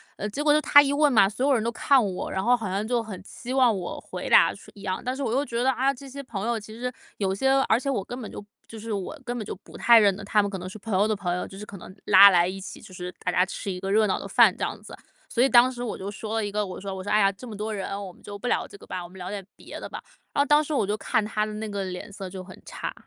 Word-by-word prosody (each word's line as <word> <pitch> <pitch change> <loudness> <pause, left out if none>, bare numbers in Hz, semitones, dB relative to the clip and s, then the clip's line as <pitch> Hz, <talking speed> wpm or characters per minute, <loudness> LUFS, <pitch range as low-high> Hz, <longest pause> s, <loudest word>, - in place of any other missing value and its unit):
呃， 210 - -4
结 245 +8 -4
果 295 0 +4
就 305 - +3
他 290 - +8
一 285 0 0
问 295 0 +3
嘛， 205 -6 +6
所 220 +6 -2
有 285 - +4
人 235 - +2
都 230 - 0
看 265 +2 +3
我， 190 -3 -3
然 190 - -1
后 245 +3 +4
好 220 -5 -4
像 200 +3 -2
就 240 -1 0
很 200 -5 -8
期 245 +5 -7
望 250 -5 +4
我 180 -1 -5
回 - - -7
答 - - +6
似 - - -15
一 200 - -13
样。 185 -2 -2
但 255 - -2
是 275 - -6
我 235 -4 -1
又 275 +3 +1
觉 235 -3 -2
得， 260 - +3
哎 255 +1 -2
呀， 275 - +4
这 275 +1 -11
些 280 +1 -7
朋 220 -5 -5
友 235 -1 0
其 215 0 -9
实 250 +2 -4 0.3
有 190 -2 0
些 265 +7 +1 0.2
而 220 - +4
且 270 +3 -3
我 220 -8 -1
根 245 +4 -7
本 220 - -7
就 - - -8 0.3
就 225 - -9
是 220 0 -5
我 200 +10 -5
根 245 0 -3
本 220 - -4
就 - - -5
不 - - -12
太 235 -1 +7
认 200 -3 +4
得。 200 - -9
他 210 +1 +3
们 200 - -2
可 195 - -5
能 180 +1 -6
是 215 - -10
朋 220 +1 -5
友 200 - +4
的 215 - +1
朋 180 -3 -2
友， 180 - -3
就 195 - -11
是 210 - -7
可 200 - -11
能 185 0 -11
拉 200 0 +9
来 175 -2 +4
一 190 +1 -5
起， 190 - -8
就 200 - -14
是 180 0 -6
大 - - -2
家 180 - +4
吃 195 - -6
一 180 -1 -4
个 195 0 -3
热 215 +1 +4
闹 190 - 0
的 - - -7
饭 - - +5
这 - - -5
样 - - -3
子。 - - -10 0.3
所 245 - +2
以 270 - +4
当 250 +1 +6
时 245 -1 -8
我 240 -3 -3
就 195 +2 -5
说 215 +1 -5
了 225 -2 0
一 205 - -4
个， 210 +1 0
我 185 -2 -6
说 195 0 -5
我 190 - -6
说： 205 - -6
“哎 215 - +4
呀， 195 -1 +4
这 200 +6 -12
么 215 -3 -8
多 215 +1 -3
人， 195 -3 -4 0.2
我 185 - -9
们 - - -22
就 205 - -8
不 205 - -5
聊 - - 0
这 - - -13
个 - - -15
吧， 180 - -5
我 175 - -10
们 190 - -14
聊 180 +1 -6
点 205 -1 -5
别 - - -10
的 - - -7
吧。” - - -6 0.3
然 - - -3
后 285 - +4
当 295 +1 +4
时 300 0 -3
我 215 - +2
就 205 +2 -1
看 215 0 0
他 210 0 -1
的 215 - -3
那 215 +1 -5
个 200 -1 -3
脸 185 +3 -7
色 190 -2 -7
就 185 0 -7
很 185 0 -12
差。 - - -6
210 Hz, 370 characters per minute, -25 LUFS, 195-245 Hz, 0.3 s, 拉